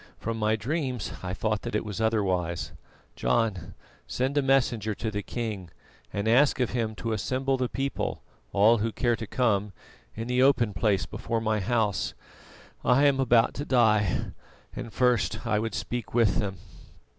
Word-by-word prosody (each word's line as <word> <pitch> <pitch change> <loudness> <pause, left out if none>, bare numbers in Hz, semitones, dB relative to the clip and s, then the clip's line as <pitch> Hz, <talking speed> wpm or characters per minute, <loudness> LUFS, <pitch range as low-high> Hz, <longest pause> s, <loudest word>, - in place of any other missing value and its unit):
"From 115 0 -3
my 110 0 +2
dreams 130 - -3
I 90 0 -4
thought 110 0 -1
that - - -4
it 105 - 0
was 105 +1 -4
otherwise. 95 -6 0 0.4
John, 90 - 0 0.3
send 130 +3 -1
a 145 - +4
messenger 120 -6 +1
to 110 +1 -3
the 105 0 -2
king 105 -6 -5 0.4
and 100 +1 -2
ask 135 +5 +4
of 125 -2 +1
him 115 -3 -1
to 115 +2 -3
assemble 130 +5 0
the 125 -2 -1
people, 135 +1 -3 0.3
all 110 +3 +5
who 115 +2 0
care 120 +1 +1
to 115 -1 -6
come, 105 -5 +1 0.4
in 115 +1 -5
the 125 0 +2
open 125 -6 +4
place 95 +1 +1
before 115 -1 -3
my 110 -1 0
house. 110 -1 0 0.7
I 130 +4 +4
am 140 -2 +3
about 120 -3 +4
to 140 - -4
die, 110 - +2 0.4
and 115 - -6
first 120 -3 +1
I 110 -2 +1
would 110 +1 -3
speak 120 -1 -4
with 115 -5 +3
them." 95 -2 -2
115 Hz, 170 wpm, -27 LUFS, 105-125 Hz, 0.7 s, all